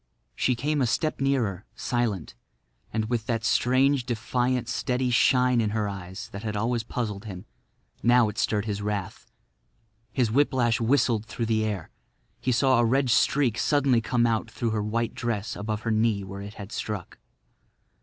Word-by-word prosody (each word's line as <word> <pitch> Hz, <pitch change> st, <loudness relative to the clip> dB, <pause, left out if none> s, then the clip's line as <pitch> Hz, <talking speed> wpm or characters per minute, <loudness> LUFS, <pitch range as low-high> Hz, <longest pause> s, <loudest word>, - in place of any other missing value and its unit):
She 125 Hz, -, +1 dB
came 145 Hz, +4 st, 0 dB
a 125 Hz, -, +2 dB
step 155 Hz, +5 st, -1 dB
nearer, 120 Hz, -9 st, 0 dB
silent, 120 Hz, -, -2 dB, 0.6 s
and 110 Hz, -1 st, -1 dB
with 115 Hz, -2 st, -2 dB
that 115 Hz, -2 st, -1 dB
strange, 130 Hz, +3 st, +3 dB
defiant, 120 Hz, +1 st, -1 dB
steady 125 Hz, 0 st, -1 dB
shine 125 Hz, 0 st, +4 dB
in 110 Hz, -, 0 dB
her 105 Hz, -1 st, 0 dB
eyes 100 Hz, +2 st, -7 dB
that 100 Hz, -, -7 dB
had 105 Hz, -2 st, -3 dB
always 115 Hz, +2 st, 0 dB
puzzled 110 Hz, -3 st, -4 dB
him. 95 Hz, -4 st, -8 dB, 0.6 s
Now 120 Hz, -1 st, +5 dB
it 105 Hz, -, -4 dB
stirred 105 Hz, -1 st, +1 dB
his 105 Hz, -2 st, -3 dB
wrath. 100 Hz, -2 st, -4 dB, 0.8 s
His 120 Hz, -5 st, +1 dB
whiplash 125 Hz, -3 st, +2 dB
whistled 115 Hz, -3 st, +2 dB
through 115 Hz, +2 st, -3 dB
the 110 Hz, -1 st, +1 dB
air. 105 Hz, -6 st, -3 dB, 0.5 s
He 130 Hz, -, 0 dB
saw 130 Hz, +1 st, +3 dB
a -, -, +4 dB
red 130 Hz, +2 st, +2 dB
streak 125 Hz, -1 st, +3 dB
suddenly 140 Hz, -5 st, +3 dB
come 120 Hz, +1 st, +1 dB
out 115 Hz, -2 st, 0 dB
through 115 Hz, -2 st, -2 dB
her 110 Hz, -1 st, 0 dB
white 115 Hz, +2 st, -1 dB
dress 115 Hz, -3 st, -3 dB
above 105 Hz, +1 st, -3 dB
her 115 Hz, -, -1 dB
knee 110 Hz, -2 st, +2 dB
where 100 Hz, +1 st, -7 dB
it 100 Hz, +1 st, -8 dB
had 100 Hz, 0 st, -9 dB
struck. 105 Hz, -5 st, -5 dB
115 Hz, 170 wpm, -26 LUFS, 105-125 Hz, 0.8 s, Now